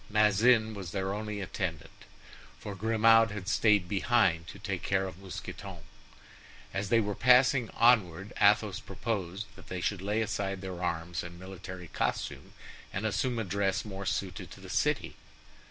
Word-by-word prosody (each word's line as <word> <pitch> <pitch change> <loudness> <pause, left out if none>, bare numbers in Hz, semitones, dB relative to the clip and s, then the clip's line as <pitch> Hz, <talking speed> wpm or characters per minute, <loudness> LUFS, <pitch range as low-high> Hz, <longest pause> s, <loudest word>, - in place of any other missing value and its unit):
Bazin 110 +2 +4
was 95 -5 -7
their 95 -1 -1
only 105 0 -4
attendant, 90 -5 -5 0.5
for 105 - -7
Grimaud 115 +2 +4
had 100 -2 -6
stayed 105 -3 +3
behind 95 -5 +2
to 90 - -9
take 100 -3 -4
care 95 -1 +1
of 95 -2 -8
Mousqueton. 95 0 -8 1.0
As 100 0 -2
they 115 - +5
were 105 -2 -1
passing 125 +1 +4
onward, 100 -6 +3
Athos - - +4
proposed 100 -3 -4
that - - -15
they 90 - -4
should 95 +1 -1
lay 105 +3 0
aside 95 -2 -3
their 95 -2 -6
arms 85 -1 -2
and 85 0 -9
military 95 -1 -8
costume, - - -3 0.4
and 100 +4 -3
assume 120 +3 0
a 115 - 0
dress 100 0 0
more 100 -2 -6
suited 100 -3 -3
to - - -12
the - - -9
city. - - 0
100 Hz, 155 wpm, -30 LUFS, 95-110 Hz, 1.0 s, they